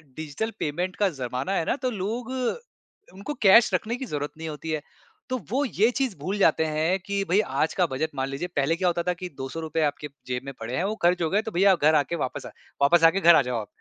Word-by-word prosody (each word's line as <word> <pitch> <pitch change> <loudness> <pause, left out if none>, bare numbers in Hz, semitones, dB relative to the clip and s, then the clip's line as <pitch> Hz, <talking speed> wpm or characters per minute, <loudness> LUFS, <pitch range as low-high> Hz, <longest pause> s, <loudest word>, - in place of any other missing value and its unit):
Digital 160 +9 -4
payment 175 +5 -2
का 200 -2 +2
ज़माना 125 +7 -3
है 165 - 0
ना - - +1
तो 255 - 0
लोग 225 +5 -4 0.8
उनको 200 +10 -6
कैश 230 +5 +7
रखने 230 +2 0
की 265 +1 -5
ज़रूरत 145 -6 -4
नहीं 160 - -6
होती 155 +2 -7
है। 155 -2 -1 0.5
तो 255 - 0
वो 275 +3 +1
ये 225 -1 +2
चीज़ 260 -5 -1
भूल 190 +8 -3
जाते 160 -5 +3
हैं 160 +5 0
कि 200 0 -1
भई 190 - +4 0.2
आज 160 - +1
का 180 - +5
बजट 155 +4 -1
मान 135 0 -1
लीजिए 140 +6 -4
पहले 145 +3 +2
क्या 180 +1 0
होता 170 0 0
था 180 0 0
कि 180 0 -7
₹200 160 +4 -3
आपके 150 0 -2 0.2
जेब 125 0 -3
में 135 - -6
पड़े 115 +3 -4
हैं, - - 0
वो 210 +3 -1
ख़र्च 175 +1 +3
हो 160 - +1
गए 205 +3 +2
तो - - -2
भैया 195 +3 +4
आप 180 - +1
घर 155 +1 +5
आके 150 +3 +1
वापस 130 -6 -4
आ - - -7 0.3
वापस 165 +4 +5
आके 165 +4 +5
घर 170 -2 +8
आ - - +6
जाओ 120 -2 -1
आप। 105 - -9
170 Hz, 250 wpm, -25 LUFS, 150-195 Hz, 0.8 s, घर